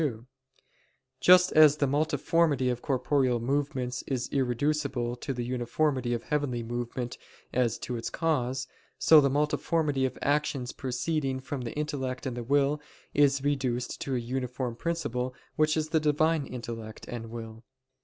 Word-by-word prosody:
2: 120 -7 -2 0.9
Just 180 0 +6
as 155 -1 +7
the 145 - +2
multiformity 145 -1 +2
of 120 0 -4
corporeal 130 -2 +1
movements 130 0 -1
is 130 -2 -2
reducible 130 -1 0
to 125 - -5
the 120 -2 -3
uniformity 125 +1 0
of 115 - -4
the - - -22
heavenly 140 -5 0
movement 120 +1 -4 0.3
as 120 -2 +1
to 125 - -5
its 115 - -3
cause: 130 -5 0 0.3
so 155 -2 +7
the 140 - +3
multiformity 150 0 +1
of - - -8
actions 145 -3 0
proceeding 135 +1 -2
from 135 0 -5
the 120 -2 -5
intellect 140 -4 -3
and 130 -3 -3
the 120 - -4
will 145 +3 +2 0.3
is 140 -1 +3
reduced 130 -4 -1
to 135 - -2
a - - +1
uniform 125 0 -3
principle 125 -5 -2 0.2
which 155 +1 +2
is 155 0 -1
the 160 - +3
Divine 155 0 +2
intellect 115 -3 -7
and 115 -2 -6
will. 115 0 -8
130 Hz, 155 wpm, -28 LUFS, 120-150 Hz, 0.9 s, as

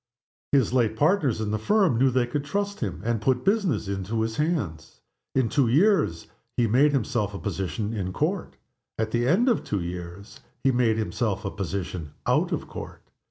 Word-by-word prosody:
His 130 -5 +3
late 115 -4 +2
partners 150 - +2
in 105 -1 -2
the 110 - -1
firm 185 - +3
knew 135 +1 +5
they 125 -1 +2
could 140 +4 -3
trust 200 +6 -2
him, 95 -6 -4
and 115 -2 0
put 125 +2 +1
business 190 - +1
into 100 +3 -2
his 110 0 -2
hands. 105 - -2 0.4
In 130 -3 +3
two 140 0 +2
years 145 - +3 0.3
he 120 - +4
made 130 +7 +4
himself 110 -6 -1
a - - -3
position 95 +2 -3
in 95 -4 -2
Court. - - -2 0.4
At 110 0 -1
the 120 +1 +1
end 200 - +3
of 240 - +4
the - - -10
two 100 -3 -1
years 90 +7 -7 0.2
he 135 - +4
made 120 -3 +2
himself 110 -2 -1
a 100 - -2
position 90 -5 -4
out - - +2
of - - -2
Court. - - -8
115 Hz, 190 wpm, -26 LUFS, 100-140 Hz, 0.4 s, knew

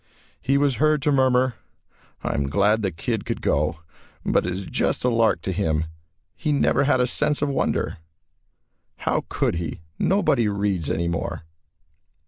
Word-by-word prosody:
He 135 +2 +2
was 140 -4 +2
heard 155 +1 +2
to 150 - +3
murmur, 130 -2 +3 0.7
"I - - -1
am 70 -1 -1
glad 105 +6 +3
the 100 - 0
kid 80 - -3
could - - -3
go, 75 +3 0 0.4
but - - +2
it - - -1
is 95 +1 -5
just - - -1
a 125 - +3
lark 115 -1 +2
to 95 - -1
him. 80 -4 0 0.5
He 155 - -1
never 140 -1 +3
had 135 -2 +3
a 125 - +4
'sense 150 +3 0
of 145 - +1
wonder.' 135 - -1 1.0
How - - -1
could - - 0
he 85 -2 -4 0.2
nobody 140 - +2
reads 100 -5 -1
anymore." 85 0 -2
110 Hz, 160 wpm, -24 LUFS, 85-140 Hz, 1.0 s, a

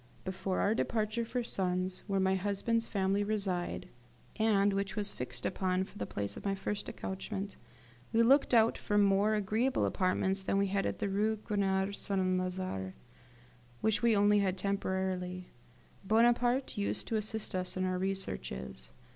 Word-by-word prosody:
Before 190 0 -2
our 210 - +3
departure 225 0 0
for 245 +1 -2
Sens, 185 -3 -1
where 195 -1 +1
my 190 0 +3
husband's 205 +4 0
family 195 0 +1
reside, 200 -4 -1 0.5
and 205 -2 +3
which 200 0 -2
was 210 -2 -1
fixed 125 -1 -6
upon 185 0 0
for - - -11
the 100 - -3
place 100 0 -3
of - - -9
my 195 -1 0
first 200 +1 -4
accouchement, 195 +1 -5 0.6
we 230 +1 +4
looked 275 +4 +5
out 230 -2 +4
for 205 - 0
more 200 +1 +4
agreeable 220 +6 +1
apartments 190 +1 +1
than 195 +1 0
we 200 - +3
had 195 0 0
in - - -2
the - - -1
Rue 210 +3 +1
Grenier 200 -2 0
St. 200 -1 -1
Lazare, 185 - -1 0.9
which 220 -1 +2
we 235 -2 +4
only 205 +1 +5
had 190 -2 +1
temporarily. 185 -2 -2 0.5
Bonaparte 240 +4 +3
used 200 - -1
to 225 - -1
assist 215 0 -2
us 185 0 -1
in 185 - 0
our 185 0 -1
researches. 65 - -4
195 Hz, 160 wpm, -32 LUFS, 185-215 Hz, 0.9 s, looked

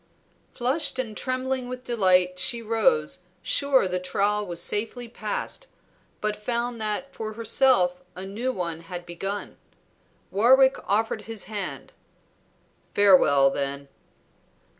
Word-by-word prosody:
Flushed 260 +3 0
and 230 -5 -3
trembling 255 0 -2
with 255 0 -6
delight 185 -6 +2
she 235 +5 +1
rose, 230 - +1 0.2
sure 275 -7 +2
the 180 0 -1
trial 205 +3 0
was 170 -1 -2
safely 230 +6 -2
passed, 230 - -4 0.5
but 215 0 0
found 235 +2 -3
that 215 +6 -2
for 220 -1 -5
herself 225 -5 +3
a 185 +1 -6
new 225 +7 -2
one 170 -7 -4
had 175 +1 -7
begun. 195 +4 -5 0.7
Warwick 260 +6 +5
offered 215 +1 0
his 225 -2 -5
hand. 205 -3 -5 1.0
"Farewell, 150 -9 +6
then." 140 0 -4
215 Hz, 120 wpm, -25 LUFS, 185-245 Hz, 1.0 s, Farewell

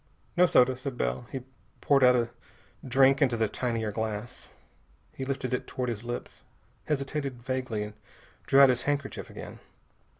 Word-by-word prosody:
"No 180 0 +6
soda," 130 -4 +4
said 130 0 -6
Bell. 60 +1 -2
He 135 - -4 0.4
poured 140 -2 +3
out 125 0 +7
a 120 -1 0 0.5
drink 135 +1 +4
into 125 -4 +3
the 110 -1 +2
tinier 115 -1 -2
glass. 110 +1 -4 0.6
He 135 - -5
lifted 130 -1 -3
it 125 - -2
toward 125 -1 -3
his 115 -2 -4
lips, 120 0 -6 0.5
hesitated 140 -3 -2
vaguely, 130 -4 -2
and 105 0 -7 0.5
drew 135 - +6
out 135 - +9
his 125 -1 +1
handkerchief 140 -2 -3
again. - - -9
125 Hz, 160 wpm, -28 LUFS, 115-135 Hz, 0.6 s, out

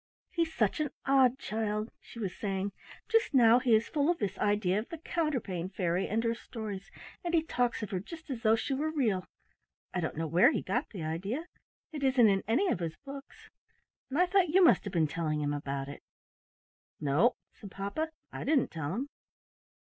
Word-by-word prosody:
"He's 335 -2 0
such 220 -1 +1
an 300 -1 0 0.2
odd 265 -2 +4
child," 215 -2 -2
she - - -14
was 200 -6 -3
saying; 195 -1 -2 0.4
"just 450 - +2
now 235 -1 +7
he 240 -3 +4
is 220 +1 +2
full 290 +1 +1
of 350 - +2
this 200 - -2
idea 205 -2 +2
of 220 - -7
the 330 - -6
Counterpane 260 - -2
Fairy 185 -1 0
and 225 +2 0
her 230 0 +1
stories, 215 -4 -7 0.3
and 345 -1 0
he 320 - +3
talks 245 -7 0
of 210 - -5
her 185 - -1
just 320 - -10
as 240 -3 -4
though 220 -1 +5
she 225 +4 -2
were 300 +4 0
real. 230 -12 0 0.7
I 180 - 0
don't 160 -3 -3
know 165 - -1
where 175 - +5
he - - -1
got 255 +6 -1
the 185 -7 -6
idea. 195 - -3 0.5
It 300 -3 -5
isn't 260 -5 +5
in 195 -1 +2
any 360 - +2
of - - 0
his 165 -2 -3
book 275 0 -7 0.8
and 270 - -2
I 360 - +5
thought 365 -1 +3
you 370 +4 +5
must 330 - +5
have 200 - -5
been 165 -3 +3
telling 155 -1 -1
him 145 -1 0
about 140 -1 -3
it." 140 - -8 1.0
"No," 155 - +3 0.2
said 205 - -11
papa, 200 +12 -3 0.2
"I - - -5
didn't 285 -2 +2
tell 160 +1 -3
him." 270 +5 -3
225 Hz, 200 wpm, -31 LUFS, 185-280 Hz, 1.0 s, now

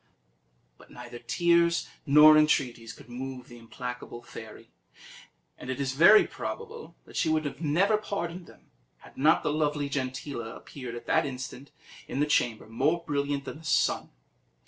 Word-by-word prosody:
But - - -17
neither 120 -1 -10
tears 170 +6 +2 0.2
nor 150 +2 +8
entreaties 125 -6 +2
could - - -14
move 125 +1 -7
the 120 0 -13
implacable 125 +1 -7
fairy; - - -11 0.9
and 130 - -9
it 130 - -3
is 135 -2 -1
very 170 +10 +7
probable 465 0 -7
that - - -15
she - - +1
would 155 -2 -1
never 180 +8 +2
have 215 - -11
pardoned 175 -4 -4
them, - - -19 0.3
had - - -16
not 155 +4 +3
the 150 - 0
lovely 150 -2 0
Gentilla 130 -3 -4
appeared 125 -4 -9
at 120 - -8
that 160 -2 +2
instant 130 +1 -7 0.4
in 135 - -4
the 145 - +3
chamber, 120 -6 0
more 145 +10 0
brilliant 140 -1 -2
than 150 - -7
the - - -16
sun. 160 - +1
140 Hz, 160 wpm, -28 LUFS, 125-160 Hz, 0.9 s, nor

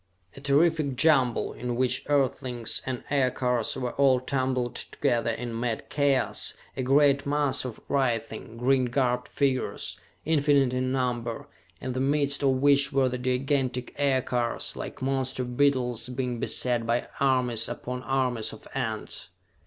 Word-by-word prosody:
A 135 - -11
terrific 145 0 +2
jumble, 130 -4 +3
in 120 0 -4
which 125 0 +1
Earthlings 125 -4 0
and 130 -2 -3
aircars 125 -4 +1
were 125 -1 -2
all 135 -2 +3
tumbled 130 -2 -1
together 120 -5 -1
in 115 0 -4
mad 115 -2 -3
chaos, 140 -3 +1 0.2
a - - -2
great 140 +2 +3
mass 145 -2 0
of 120 -4 -6
writhing, 115 -4 -1
green 130 +2 +2
garbed 125 0 0
figures. 135 -2 -1 0.3
Infinite 145 -4 +3
in 130 0 0
number 120 -3 -2 0.3
in 130 - -4
the 130 - -2
midst 140 +1 +1
of 140 - +3
which 140 +1 +3
were 135 -2 +2
the 125 0 -4
gigantic 130 0 -1
aircars, 130 -4 0
like - - -7
monster 130 -1 -1
beetles 125 -2 0
being 125 -1 -3
beset 120 -1 0
by 120 +1 0
armies 125 -4 +2
upon 125 +1 -5
armies 130 -4 -1
of - - -12
ants. 115 -5 -4
130 Hz, 140 wpm, -27 LUFS, 125-140 Hz, 0.3 s, jumble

